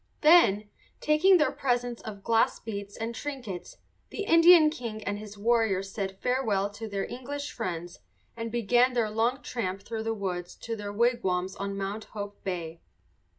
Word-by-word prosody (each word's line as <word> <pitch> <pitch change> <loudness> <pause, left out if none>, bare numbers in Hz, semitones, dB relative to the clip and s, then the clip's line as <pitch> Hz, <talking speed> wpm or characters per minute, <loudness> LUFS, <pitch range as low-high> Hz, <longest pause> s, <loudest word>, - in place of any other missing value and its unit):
Then, 255 - +6 0.3
taking 335 +5 +5
their 305 - +2
presents 245 -2 -1
of 205 -3 -8
glass 225 0 +2
beads 200 -2 -6
and 225 +1 -3
trinkets, 240 -9 -6 0.3
the 415 - -4
Indian 330 -3 +7
king 230 -8 -6
and 205 0 -3
his 210 -1 -10
warriors 205 -3 +1
said 190 -2 -4
farewell 220 -6 0
to 220 +2 -7
their 200 -1 -2
English 285 +4 -6
friends 175 -5 -5 0.4
and 230 -1 -5
began 240 +2 +3
their 230 -3 0
long 235 +5 0
tramp 195 -5 -3
through 225 +1 -4
the 225 0 -2
woods 180 -4 -4
to 230 - -5
their 205 -1 -5
wigwams 205 -5 0
on 200 0 -4
Mount 200 +2 -4
Hope 205 -1 -8
Bay. 170 -3 -4
220 Hz, 160 wpm, -28 LUFS, 200-245 Hz, 0.4 s, Indian